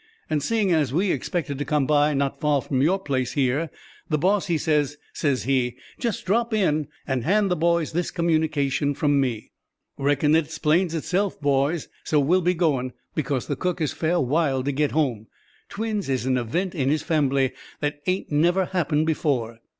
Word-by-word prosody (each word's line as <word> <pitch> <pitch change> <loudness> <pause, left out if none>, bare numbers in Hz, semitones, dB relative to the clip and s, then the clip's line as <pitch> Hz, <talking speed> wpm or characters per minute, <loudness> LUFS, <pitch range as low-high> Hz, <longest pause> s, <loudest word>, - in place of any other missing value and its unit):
And 150 -1 +1
seein' 210 +3 +1
as 155 -6 +2
we 180 +6 +1
expected 145 -6 -2
to - - 0
come 145 -1 +1
by 150 +1 +3
not 140 0 -1
far 150 -3 +2
from 130 -2 -1
your 175 +7 +3
place 130 -9 -2
here, 140 +3 +1 0.4
the 155 - +2
boss 195 +6 +1
he 170 -2 +1
says, 150 -2 0 0.2
says 140 -4 0
he: 125 -2 0 0.2
'Just 235 -4 -2
drop 230 +3 +1
in, 155 -8 +1 0.2
and 130 -3 -1
hand 200 - +2
the - - +3
boys 170 -1 +1
this 175 +2 -1
communication 155 -4 0
from 145 -1 +2
me.' 120 -5 -3 0.5
Reckon 145 +2 +2
it 160 -1 +3
'splains 165 +2 +1
itself, 185 +5 -1
boys. 145 +2 +1 0.2
So 150 - +2
we'll 170 +7 +3
be 180 +1 +1
goin', 135 -7 0 0.2
because 140 -4 -1
the 145 - -2
cook 180 +5 -2
is 155 -3 -1
fair 170 +2 0
wild 135 -1 +1
to 140 - +1
get 145 +1 +1
home. 125 -8 -1 0.4
Twins 210 -5 -3
is 130 -2 0
an 130 0 +2
event 165 +10 -1
in 135 -6 0
his 150 +1 +1
fambly 140 -5 +1 0.3
that 145 0 -2
ain't 185 -2 -1
never 175 +5 +3
happened 155 -4 0
before." 130 -8 -1
150 Hz, 185 wpm, -24 LUFS, 135-170 Hz, 0.5 s, by